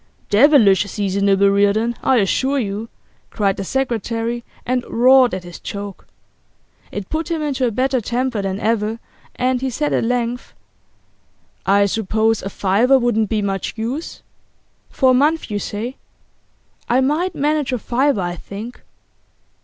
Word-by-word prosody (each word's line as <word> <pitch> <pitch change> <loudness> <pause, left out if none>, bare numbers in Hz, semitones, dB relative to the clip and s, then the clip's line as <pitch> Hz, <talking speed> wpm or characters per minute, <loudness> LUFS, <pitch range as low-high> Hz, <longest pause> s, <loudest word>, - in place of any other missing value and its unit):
'Devilish 215 -5 +5
seasonable, 200 0 +2
Reardon, 205 +4 +2
I 265 - +3
assure 260 +7 +1
you!' 215 -1 -3 0.4
cried 200 -2 0
the - - -4
secretary, 235 -1 -2 0.2
and 250 0 0
roared 250 -1 +5
at 185 - -6
his 175 -1 -10
joke. 200 -1 -7 0.8
It 205 -2 -5
put 320 +2 -2
him 325 -2 -1
into 270 -4 0
a - - -1
better 255 +2 0
temper 245 0 -1
than 195 0 -3
ever, 220 0 0 0.4
and 255 0 0
he 265 - -1
said 295 +4 -1
at - - +1
length: 245 0 -2 1.1
'I 200 +1 +4
suppose 220 +2 0
a 195 - -5
fiver 210 +8 +3
wouldn't 235 -4 +1
be 215 -2 0
much 195 -1 -2
use? 245 +9 -5 0.7
For 260 -2 +3
a - - +4
month, 295 0 +1
you 205 - -1
say? 225 +7 -5 0.9
I 245 +2 +3
might 310 +7 0
manage 295 -1 0
a 250 - 0
fiver, 250 0 0
I 175 0 -3
think. 215 +8 -9
230 Hz, 145 wpm, -19 LUFS, 200-260 Hz, 1.1 s, Devilish